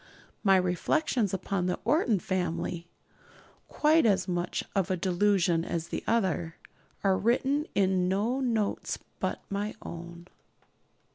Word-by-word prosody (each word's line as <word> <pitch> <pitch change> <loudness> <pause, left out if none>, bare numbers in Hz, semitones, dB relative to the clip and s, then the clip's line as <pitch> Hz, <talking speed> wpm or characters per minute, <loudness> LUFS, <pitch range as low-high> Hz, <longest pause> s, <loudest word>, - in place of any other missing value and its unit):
My 195 -2 +5
reflections 195 - +1
upon 190 -1 -1
the 180 - -1
Orton 245 - +3
family 175 -1 -2 0.8
quite 310 +2 +3
as 195 -4 +2
much 175 -1 -2
of 195 -1 +1
a 185 - 0
delusion 180 -2 +2
as 170 -1 -3
the - - -4
other 185 -7 0 0.5
are 190 -2 +3
written 270 +6 +1
in 185 -2 +2
no 210 +8 0
notes 225 -6 -1 0.2
but - - -2
my 205 +2 -2
own. 170 0 -8
190 Hz, 125 wpm, -29 LUFS, 175-220 Hz, 0.8 s, My